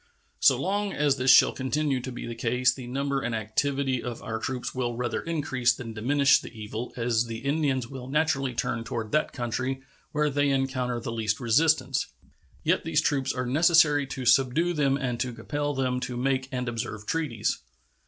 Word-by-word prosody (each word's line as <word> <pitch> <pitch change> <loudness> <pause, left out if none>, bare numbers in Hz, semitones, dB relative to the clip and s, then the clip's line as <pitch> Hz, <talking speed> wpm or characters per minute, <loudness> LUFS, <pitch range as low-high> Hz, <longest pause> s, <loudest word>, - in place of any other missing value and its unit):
So - - +5
long 200 +1 -1
as 145 -1 +2
this 130 0 +1
shall - - +8
continue 140 +1 -1
to 130 - -6
be 120 - -6
the 120 - -5
case 125 +2 +1
the 130 -2 -9
number 140 +2 -1
and 120 - -2
activity 130 +4 -1
of 120 -2 -6
our 110 0 -3
troops 125 +2 -4
will 120 -2 -2
rather 120 0 -2
increase 135 -7 0
than 115 -3 -7
diminish 140 +6 +3
the - - -10
evil, 110 +1 -6
as 115 -1 +1
the 115 +3 -6
Indians 140 -4 0
will 130 -1 -8
naturally 135 -3 0
turn 115 -1 -1
toward 115 -2 -4
that 155 - +1
country 130 +2 -3 0.3
where 150 0 +1
they 145 +1 +2
encounter 130 -3 0
the 115 - -5
least 110 -2 -1
resistance. 150 +7 +2 0.6
Yet - - +2
these 160 -2 +1
troops 140 -3 +1
are 125 -1 -3
necessary 150 +1 +4
to 130 -1 -5
subdue 135 +8 +3
them 140 -3 +2
and 125 -4 -2
to 125 0 -2
compel 145 +5 -3
them 130 -1 0
to 125 -1 -4
make 130 +1 0
and 125 -1 -3
observe 110 -2 -4
treaties. 115 -7 -1
130 Hz, 185 wpm, -27 LUFS, 120-145 Hz, 0.6 s, shall